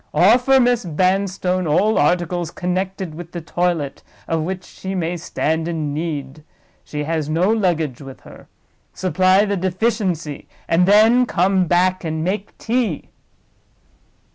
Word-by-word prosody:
Offer 250 +8 +5
Miss 245 -2 +2
Vanstone 185 +1 0
all 200 +8 +2
articles 175 +2 +1
connected 185 0 -3
with 170 +1 -10
the 175 - -4
toilet 165 -3 -2 0.3
of 165 -1 0
which 180 +3 -4
she 190 +1 -7
may 175 -1 -1
stand 160 -1 -2
in 155 -4 -3
need. 150 -2 -4 0.4
She 150 0 -5
has 155 -1 -2
no 175 +6 +2
luggage 165 - 0
with 135 -1 -11
her. - - -15 0.5
Supply 185 +2 +3
the 200 -1 -1
deficiency, 185 -5 -2 0.2
and 175 +2 +3
then 225 +5 +5
come 185 -1 +2
back 185 +2 +2
and 160 -1 -3
make 195 +3 -3
tea." 230 - -2
180 Hz, 135 wpm, -20 LUFS, 160-195 Hz, 0.5 s, Offer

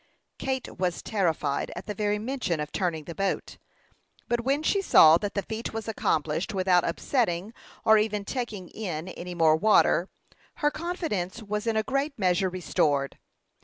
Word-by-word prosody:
Kate 265 -7 -3
was 180 -2 -1
terrified 165 -8 -1
at 175 - -7
the 210 - -4
very 210 0 0
mention 220 - -2
of 150 0 -4
turning 170 -5 -1
the 170 - -7
boat; 195 +2 -2 0.7
but 240 0 0
when 275 +5 0
she 395 +5 +2
saw 160 - +7
that 205 -1 -4
the 200 - 0
feat 220 +1 -5
was 225 0 -5
accomplished 165 -2 -1
without 185 -2 +3
upsetting 195 0 -1 0.3
or 220 0 +7
even 210 -1 -1
taking 220 -8 -4
in 180 -5 -5
any 180 0 -7
more 160 -2 +5
water, 190 -1 +3 0.5
her 295 0 +1
confidence 305 - -3
was 210 +2 -3
in 225 -1 +1
a 220 - +2
great 275 +4 -1
measure 185 -1 +2
restored. 145 -6 0
200 Hz, 165 wpm, -27 LUFS, 175-225 Hz, 0.7 s, saw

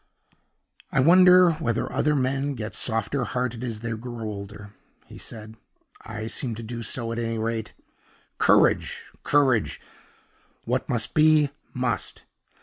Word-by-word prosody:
"I - - +1
wonder 180 +4 +7
whether 125 -6 -2
other 150 +1 +2
men 135 +1 0
get 110 -2 -5
softer 115 +4 0
hearted 125 0 -3
as 115 -3 -4
they 115 0 -4
grow 120 +1 -6
older!" 105 0 -8 0.3
he - - -12
said. 110 0 -8 0.4
"I 110 0 -6
seem 115 +1 -3
to 115 - -7
do 115 +1 -6
so, 115 0 -3
at 115 - -3
any 115 -1 -2
rate. 110 0 -3 0.6
Courage! - - +3 0.2
courage! 135 -6 +2 0.9
what - - -1
must 115 -3 -1
be, 155 -2 +4 0.2
must. 125 -4 -3
120 Hz, 135 wpm, -25 LUFS, 110-135 Hz, 0.9 s, wonder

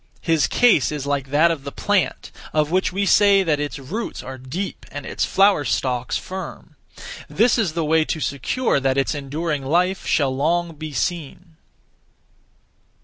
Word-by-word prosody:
His 165 -5 +2
case 225 - +3
is 145 -2 -4
like 140 -2 -2
that 155 +4 +4
(of 150 -5 -4
the 140 - -6
plant) 205 +3 -1 0.2
of 155 0 +1
which 185 +1 +1
we 200 +2 -1
say 200 -1 +5
that 155 -5 +1
its 145 0 -3
roots 170 - -5
are 130 0 -8
deep 160 +10 -5
and 145 -1 -7
its - - -1
flower 195 -6 +3
stalks 125 -3 -1
firm: 190 +1 -8 0.5
this 235 +2 +3
is 190 -8 0
the 165 -1 -1
way 160 +1 +3
to 160 - -3
secure 140 - 0
that 135 0 0
its 135 - +1
enduring 145 +1 -3
life 180 +7 0
shall 135 -3 +1
long 165 +4 0
be 155 0 -7
seen. 165 +4 -4
155 Hz, 165 wpm, -21 LUFS, 140-180 Hz, 0.5 s, say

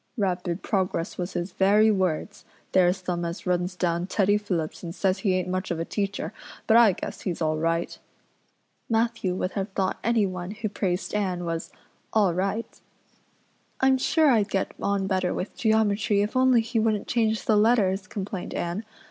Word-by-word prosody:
'Rapid 180 -3 -1
progress' 185 -5 -1
was 180 +1 -3
his 175 +2 -3
very 205 +4 +4
words. 190 0 -1 0.3
There's 185 0 +3
them 175 -1 -2
as 170 +1 -5
runs 180 0 0
down 175 -1 -1
Teddy 205 0 +2
Phillips 180 -7 -2
and 170 -1 -6
says 190 0 +1
he 190 -1 +1
ain't 185 -1 -1
much 185 +1 -2
of 170 - -2
a 165 - -2
teacher, 200 +1 -3 0.3
but 220 - +4
I 230 -4 +7
guess - - -7
he's 175 -3 -3
all 155 -1 0
right." 165 +1 -1 0.9
Matthew 225 -5 0
would 185 0 -2
have 195 0 -3
thought 190 -1 -1
anyone 195 -6 0
who 220 0 -3
praised 185 -2 -2
Anne 185 -4 -1
was 165 +1 -4 0.4
"all 205 -5 +3
right." 195 +5 -3 1.0
"I'm 265 0 +4
sure 310 +2 +3
I'd 215 -4 +2
get 195 - -1
on 200 -1 0
better 185 -2 0
with 185 - -4
geometry 215 -2 +2
if 210 - -4
only 255 -2 +5
he 225 +1 -1
wouldn't 215 -2 +1
change 220 -2 0
the 215 - +3
letters," 205 -3 +3
complained 195 -2 -5
Anne. 175 +5 -2
195 Hz, 175 wpm, -26 LUFS, 180-215 Hz, 1.0 s, I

